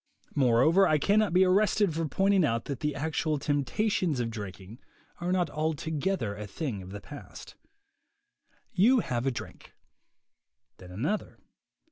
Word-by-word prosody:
Moreover, 145 Hz, +8 st, +4 dB
I 155 Hz, -, +3 dB
cannot 205 Hz, +5 st, +2 dB
be 185 Hz, +2 st, +5 dB
arrested 200 Hz, 0 st, +3 dB
for 165 Hz, 0 st, -1 dB
pointing 195 Hz, +3 st, +2 dB
out 115 Hz, -6 st, 0 dB
that 140 Hz, -3 st, -4 dB
the 150 Hz, -2 st, -2 dB
actual 155 Hz, +1 st, -1 dB
temptations 150 Hz, -, 0 dB
to 120 Hz, -, 0 dB
drinking 105 Hz, -1 st, -8 dB, 0.4 s
are 175 Hz, +1 st, -2 dB
not 180 Hz, -4 st, +1 dB
altogether 155 Hz, -, -2 dB
a 105 Hz, 0 st, -7 dB
thing 110 Hz, -, -4 dB
of 90 Hz, -, -10 dB
the 100 Hz, +1 st, -8 dB
past. 145 Hz, +7 st, -11 dB, 1.2 s
You 230 Hz, +6 st, +4 dB
have 120 Hz, -, -2 dB
a -, -, +2 dB
drink; 120 Hz, -, -9 dB, 1.0 s
then 90 Hz, -, -13 dB
another. 140 Hz, -, -3 dB
150 Hz, 140 wpm, -28 LUFS, 120-185 Hz, 1.2 s, be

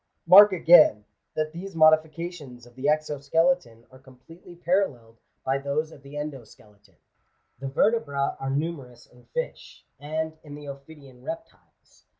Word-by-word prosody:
Mark 200 Hz, +4 st, +9 dB
again, 165 Hz, -, +5 dB, 0.3 s
that 155 Hz, 0 st, -2 dB
these 185 Hz, +2 st, -8 dB
modifications 155 Hz, -4 st, +1 dB
of 120 Hz, -, -18 dB
the 130 Hz, +3 st, -8 dB
exo 150 Hz, -1 st, 0 dB
skeleton 140 Hz, -6 st, 0 dB
are 130 Hz, -, -16 dB
completely 140 Hz, +7 st, -16 dB
paralleled 150 Hz, -, -2 dB, 0.2 s
by 135 Hz, +1 st, 0 dB
those 145 Hz, +3 st, -2 dB
of 145 Hz, -, -15 dB
the 140 Hz, +1 st, -11 dB
endo 145 Hz, -4 st, -5 dB
skeleton. 105 Hz, -3 st, -22 dB, 0.6 s
The 135 Hz, -, -5 dB
vertebra 140 Hz, -3 st, 0 dB
are 135 Hz, -, -4 dB
numerous 135 Hz, -5 st, -4 dB
in 125 Hz, 0 st, -22 dB
fish, -, -, -7 dB
and 155 Hz, +2 st, -4 dB
in 145 Hz, -2 st, -10 dB
the 145 Hz, 0 st, -11 dB
ophidian 140 Hz, -2 st, -12 dB
reptiles. 215 Hz, +10 st, -11 dB
145 Hz, 145 wpm, -25 LUFS, 130-165 Hz, 0.6 s, Mark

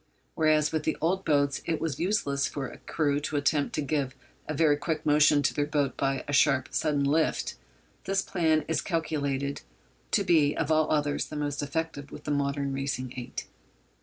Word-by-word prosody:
Whereas 155 Hz, -1 st, +3 dB
with 160 Hz, -, 0 dB
the 155 Hz, -, -1 dB
old 185 Hz, +4 st, 0 dB
boats 140 Hz, -2 st, +1 dB
it 165 Hz, -2 st, 0 dB
was 155 Hz, -3 st, -3 dB
useless 150 Hz, -7 st, +1 dB
for 140 Hz, -3 st, -4 dB
a -, -, -11 dB
crew 145 Hz, -2 st, 0 dB
to 150 Hz, +1 st, -4 dB
attempt 145 Hz, 0 st, +1 dB
to 150 Hz, -, -1 dB
give 140 Hz, -2 st, -1 dB, 0.3 s
a 155 Hz, -, -2 dB
very 150 Hz, -1 st, +4 dB
quick 155 Hz, +2 st, -3 dB
motion 150 Hz, -1 st, +5 dB
to 140 Hz, -, +2 dB
their 145 Hz, 0 st, 0 dB
boat 145 Hz, -2 st, 0 dB
by 135 Hz, -1 st, -1 dB
a 145 Hz, -, -3 dB
sharp, 140 Hz, -2 st, +3 dB
sudden 150 Hz, -3 st, +1 dB
'lift,' 155 Hz, +3 st, +1 dB, 0.5 s
this 195 Hz, 0 st, +1 dB
plan 160 Hz, -3 st, +1 dB
is 160 Hz, -, 0 dB
calculated 140 Hz, -5 st, -2 dB, 0.5 s
to 205 Hz, -, +2 dB
be, 155 Hz, -5 st, +3 dB
of 160 Hz, -1 st, 0 dB
all 155 Hz, 0 st, +3 dB
others, 145 Hz, -1 st, 0 dB
the -, -, -8 dB
most 145 Hz, -1 st, -2 dB
effective 145 Hz, -1 st, -3 dB
with -, -, -9 dB
the 150 Hz, -, -3 dB
modern 140 Hz, -1 st, 0 dB
racing 135 Hz, -2 st, -3 dB
eight. 125 Hz, -2 st, -6 dB
145 Hz, 190 wpm, -28 LUFS, 140-155 Hz, 0.5 s, motion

